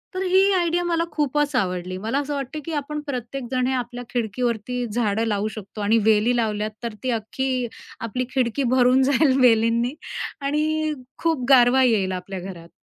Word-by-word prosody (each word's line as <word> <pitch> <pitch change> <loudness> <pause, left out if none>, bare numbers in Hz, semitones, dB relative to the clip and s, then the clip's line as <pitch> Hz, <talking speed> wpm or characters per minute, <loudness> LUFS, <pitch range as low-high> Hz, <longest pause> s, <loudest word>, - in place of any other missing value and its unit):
तर 370 - -2
ही 380 +2 +4
आयडिया 350 -1 +1
मला 335 -1 +1
खूपच 295 -1 0
आवडली. 185 -4 -1
मला 225 +8 -1
असं 290 0 -3
वाटतं, 280 +2 -4
की 330 - -4
आपण 300 +1 -3
प्रत्येक 255 0 -4
जण 255 -1 +1
हे 265 - 0
आपल्या 245 -1 -4
खिडकीवरती 240 +1 -2
झाडं 225 -1 +1
लावू 210 0 0
शकतो 210 0 -8
आणि 215 +3 +3
वेली 220 +3 +4
लावल्यात, 215 -2 -1
तर 235 -2 -3
ती 255 - -1
अख्खी 250 +3 -2 0.3
आपली 250 +3 -3
खिडकी 255 +1 +1
भरून 255 +1 +5
जाईल 275 0 +3
वेलींनी. 230 +1 +3 0.5
आणि 305 +2 0 0.3
खूप 320 -7 +1
गारवा 260 0 +6
येईल 210 -6 +2
आपल्या 185 +1 -5
घरात. 175 -2 -9
250 Hz, 170 wpm, -23 LUFS, 220-280 Hz, 0.5 s, गारवा